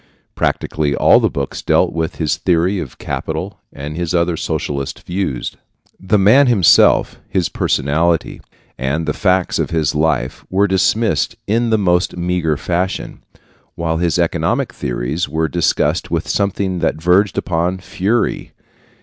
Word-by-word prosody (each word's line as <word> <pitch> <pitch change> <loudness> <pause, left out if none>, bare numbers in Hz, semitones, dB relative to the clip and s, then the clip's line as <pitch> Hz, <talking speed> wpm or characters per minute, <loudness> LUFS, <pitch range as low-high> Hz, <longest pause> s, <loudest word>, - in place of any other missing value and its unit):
Practically 75 -2 -1
all - - +5
the - - +1
books 70 -1 -4
dealt - - +2
with 80 +1 -2
his 80 -4 -1
theory 90 +2 +1
of 70 -8 -7
capital - - -4
and 75 +2 -7
his 85 0 -2
other 85 0 +1
socialistic 70 -3 -4
views. 90 -9 -3 0.5
The 100 +3 +1
man 125 +8 +5
himself, 100 -9 +4
his 90 -5 0
personality, 80 +6 0 0.4
and 70 +5 -1
the 75 - -1
facts 90 -2 +1
of - - -1
his 80 -3 0
life 75 -5 -1
were 100 +2 +2
dismissed 95 -2 +1
in 115 +3 +1
the 110 - +3
most 90 -3 +1
meager 85 -3 0
fashion, 90 +4 -3 0.5
while 80 -1 -1
his 85 -2 0
economic - - 0
theories 65 +8 -3
were 80 +2 0
discussed 85 -1 0
with - - -2
something 100 -2 -1
that 80 -2 -1
verged 90 +5 +2
upon 90 +2 -1
fury. 100 +5 -2
85 Hz, 140 wpm, -17 LUFS, 80-95 Hz, 0.5 s, all